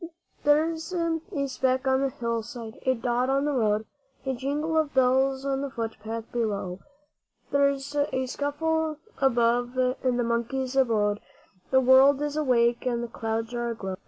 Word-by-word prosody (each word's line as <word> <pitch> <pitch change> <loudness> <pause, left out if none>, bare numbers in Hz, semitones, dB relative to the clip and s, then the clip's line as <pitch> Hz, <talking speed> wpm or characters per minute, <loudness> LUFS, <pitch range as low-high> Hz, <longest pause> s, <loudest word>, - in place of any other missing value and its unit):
There's 320 +3 +2
a 335 -2 0 0.3
speck 260 0 0
on 265 0 +3
the 275 - +1
hill 235 -2 -2
side, 230 -1 -9
a 260 - +4
dot 245 +2 0
on 275 +1 +2
the 295 - +1
road 220 -5 +1 0.4
A 265 - 0
jingle 290 +5 -2
of 310 -3 +1
bells 265 +1 +3
on 270 -1 0
the 280 - -3
foot 230 -3 -4
path 225 +1 -4
below 200 -6 -2 0.7
There's 280 0 +1
a 285 -2 0
scuffle 310 +3 -1 0.2
above 245 -1 +2 0.3
in 255 -2 +1
the 245 - +1
monkey's 240 +3 -1
abode 215 -6 +2 0.5
The 260 0 +4
world 265 +2 +6
is 295 0 -2
awake 240 -5 +2
and 240 -1 0
the - - -3
clouds 225 0 -3
are 240 0 -2
aglow. 200 -5 -4
260 Hz, 160 wpm, -26 LUFS, 235-280 Hz, 0.7 s, world